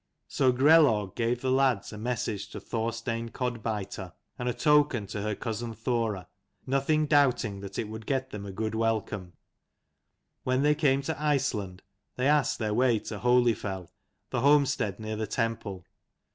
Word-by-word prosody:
So 130 -2 +2
Grelaug 130 - +4
gave 120 +1 0
the 130 - 0
lads 130 -6 +2
a - - -7
message 110 -3 -3
to - - -7
Thorstein 115 0 -3
Codbiter 110 -7 -4 0.3
and 125 0 -1
a - - 0
token 150 -7 +3
to 100 +1 -5
her 105 0 -2
cousin 115 0 -4
Thora, 110 -4 -1 0.4
nothing 140 +3 +1
doubting 125 -8 +2
that 100 0 -8
it 110 - -2
would 110 0 -8
get 130 -1 -1
them 105 -1 -6
a 100 - -6
good 110 +3 -3
welcome. 110 -5 -1 1.1
When 130 +1 +1
they 150 0 +5
came 140 -2 +2
to 140 - -3
Iceland 105 -11 -1 0.3
they 125 +2 +1
asked 150 -1 +3
their 105 -2 -1
way 120 0 +3
to 105 -1 -6
Holyfell, 115 -7 +1 0.4
the - - 0
homestead 135 -8 +3
near 110 0 -4
the 110 0 -2
temple. 110 -5 -3
115 Hz, 160 wpm, -28 LUFS, 105-130 Hz, 1.1 s, they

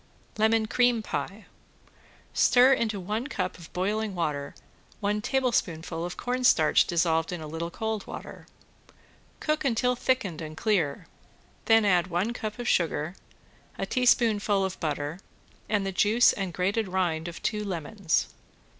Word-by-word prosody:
~LEMON 220 0 +3
CREAM 245 0 +2
PIE~ 195 +6 -4 0.9
Stir 255 +2 +5
into 220 -5 -1
one 210 +7 -3
cup 185 -10 -3
of 170 - -12
boiling 205 +2 -1
water 150 -5 -2 0.4
one 210 0 0
tablespoonful 180 - -1
of 175 +1 -5
cornstarch 245 -11 +3
dissolved 165 -1 +1
in 175 - -4
a 155 - -7
little 165 +2 -4
cold 220 +3 -4
water. - - -9 0.9
Cook 305 0 -1
until 250 -1 +1
thickened 240 -10 -1
and 155 0 -7
clear, 195 -11 0 0.6
then 225 -1 +5
add 180 -3 +3
one 185 +6 -1
cup 215 -2 -5
of 245 -1 -5
sugar, 165 -3 +1 0.6
a - - -2
teaspoonful 220 -6 +2
of 190 - -5
butter, 150 +1 -3 0.5
and 205 -2 +1
the 195 - -1
juice 215 +6 +4
and 195 -3 -3
grated 195 +5 0
rind 175 -3 -1
of 170 - -7
two 210 0 -1
lemons. 185 -1 -1
200 Hz, 140 wpm, -27 LUFS, 170-225 Hz, 0.9 s, Stir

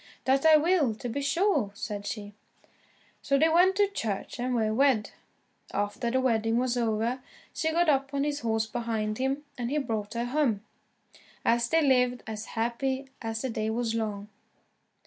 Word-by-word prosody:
"That 270 +4 +3
I 310 -1 +8
will, 305 -7 +2
to 235 - -6
be 280 +5 -2
sure," 285 - +1
said 205 -1 -5
she. 205 -2 -5 0.9
So 275 - +2
they 320 +3 +4
went 360 +4 +4
to 405 0 +4
church, 230 - -4
and 250 +1 -1
were 220 -2 +1
wed. 250 -4 +2 0.6
After 205 +4 -1
the 260 +2 +1
wedding 225 -3 +1
was 250 0 +1
over, 235 +2 0 0.3
she 320 - 0
got 340 +1 +2
up 275 -2 +2
on 280 0 0
his 290 0 -1
horse 225 -2 0
behind 220 -1 -2
him, 270 +2 -1 0.2
and 240 -1 -2
he 295 - 0
brought 220 -6 -3
her 235 +1 -1
home. 250 -6 +1 0.8
And 235 +1 +3
they 325 0 +3
lived 250 -3 +2
as 215 -1 -5
happy 260 +4 -1
as 225 0 -3
the 260 - -2
day 215 -1 -2
was 225 0 -1
long. 210 -2 -3
245 Hz, 175 wpm, -28 LUFS, 220-275 Hz, 0.9 s, I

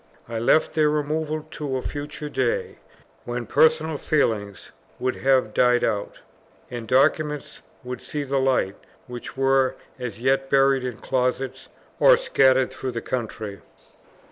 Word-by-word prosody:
I 115 -1 -3
left 120 +7 +3
their 155 -2 +3
removal 150 +1 -1
to 140 -3 -3
a 130 - -5
future 145 +1 -5
day, 130 -4 -1 0.4
when 120 0 -4
personal 160 +1 +3
feelings 105 - -1 0.3
would 130 0 -2
have 130 -5 +2
died 125 -1 +3
out, 100 -1 -2 0.5
and 120 -2 -6
documents 150 +3 +1 0.2
would 125 -1 -6
see 150 -1 -4
the 135 0 0
light, 130 -7 +1 0.3
which 125 +1 -8
were 135 -1 +3 0.2
as 120 -4 -5
yet 135 +2 +1
buried 135 -1 +4
in 125 -4 -4
closets 130 0 -2 0.3
or - - +7
scattered 130 - +3
through 130 -1 -4
the 115 - -3
country. 110 -5 -5
130 Hz, 140 wpm, -24 LUFS, 125-145 Hz, 0.5 s, or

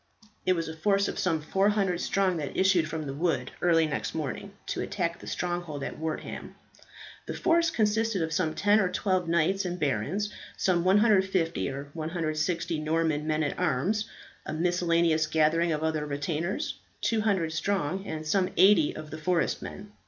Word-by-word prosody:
It 185 - +5
was 165 -2 -2
a 160 - -6
force 200 +4 +2
of - - -4
some 160 -4 0
400 195 0 +1
strong 190 -3 +1
that 145 -3 -4
issued 190 -4 +3
from 160 -1 -4
the 135 - -4
wood 145 -5 -1
early 165 -2 +4
next 150 +1 -3
morning 160 +6 -4
to - - -3
attack 170 -3 -2
the - - -11
stronghold 175 -5 -3
at - - -5
Wortham. 160 0 -5 0.7
The - - -4
force 335 0 +3
consisted 220 - +1
of 160 0 -3
some 160 -3 0
ten 205 +1 +4
or 185 -3 +2
twelve 185 -1 0
knights 170 +4 +2
and 180 -1 -3
barons, 150 - -1 0.2
some 175 -3 +2
150 190 -5 +3
or 140 +1 -6
160 165 +1 -2
Norman 155 -1 0
men 155 0 +1
at 145 - -2
arms, 180 +6 0 0.3
a - - -5
miscellaneous 170 -1 +2
gathering 160 +2 +2
of 155 0 -1
other 160 -1 0
retainers, 150 +5 -2 0.2
200 200 -8 +1
strong, 190 +1 -1
and 155 0 -5
some 185 +4 +2
eighty 190 -6 +5
of 155 -1 -8
the 155 - -6
forest 170 +2 0
men. 205 +1 -8
170 Hz, 165 wpm, -28 LUFS, 155-190 Hz, 0.7 s, It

